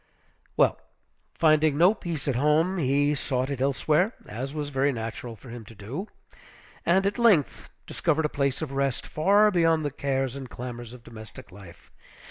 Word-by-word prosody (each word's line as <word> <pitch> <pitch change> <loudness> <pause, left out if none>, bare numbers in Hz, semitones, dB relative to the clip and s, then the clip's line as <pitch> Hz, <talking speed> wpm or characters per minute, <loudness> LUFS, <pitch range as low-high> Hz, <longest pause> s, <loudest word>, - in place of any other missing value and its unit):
Well, - - +3 0.5
finding 155 -2 +3
no 180 +6 +6
peace 170 -8 -5
at 135 - +1
home, 155 +7 +2
he 145 0 +2
sought 130 -1 -2
it 135 -2 -4
elsewhere, 150 - +1
as 130 +6 -5
was 150 -1 -3
very 140 0 +1
natural 115 0 -6
for 125 - -14
him 120 -1 -8
to 115 - -14
do; 125 - -6 0.8
and 190 +3 +3
at 200 +4 -1
length 205 - +2 0.2
discovered 160 -1 0
a - - +3
place 140 0 -1
of 145 - -5
rest, 135 -2 -1
far 200 +6 +3
beyond 165 -4 +2
the 145 - -1
cares 135 -2 -2
and 135 -2 -7
clamors 120 -1 -7
of 125 -1 -13
domestic 115 0 -12
life. 95 -3 -15
140 Hz, 170 wpm, -26 LUFS, 125-160 Hz, 0.8 s, no